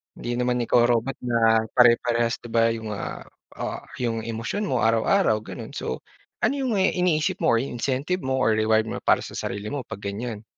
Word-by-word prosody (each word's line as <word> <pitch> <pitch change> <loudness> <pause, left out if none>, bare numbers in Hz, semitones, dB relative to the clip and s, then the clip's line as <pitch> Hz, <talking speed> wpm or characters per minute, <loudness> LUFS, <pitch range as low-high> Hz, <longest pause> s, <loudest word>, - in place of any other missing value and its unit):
Hindi 120 - -5
naman 125 0 +1
ikaw 120 +1 +4
robot 120 +2 0
na 115 -2 +3
pare-parehas 120 -1 +4
'di 120 - -11
ba 115 0 +4
'yong, 110 -1 -5
ah, - - -5 0.4
ah, - - -4 0.2
'yong 115 -2 -1
emosyon 115 - -3
mo 130 - 0
araw-araw 115 - +2
gano'n. - - -8
So 65 - -3 0.4
ano - - +2
'yong 255 -7 0 0.2
iniisip 170 -4 +1
mo - - +4
or 115 - +4
incentive 135 +7 -2
mo 130 0 0
or 110 -3 +3
reward 110 0 +2
mo - - -5
para - - +4
sa - - -8
sarili 100 +1 -4
mo 140 +2 -3
'pag 100 - -8
ganyan? 105 +2 -5
120 Hz, 185 wpm, -24 LUFS, 110-130 Hz, 0.4 s, ikaw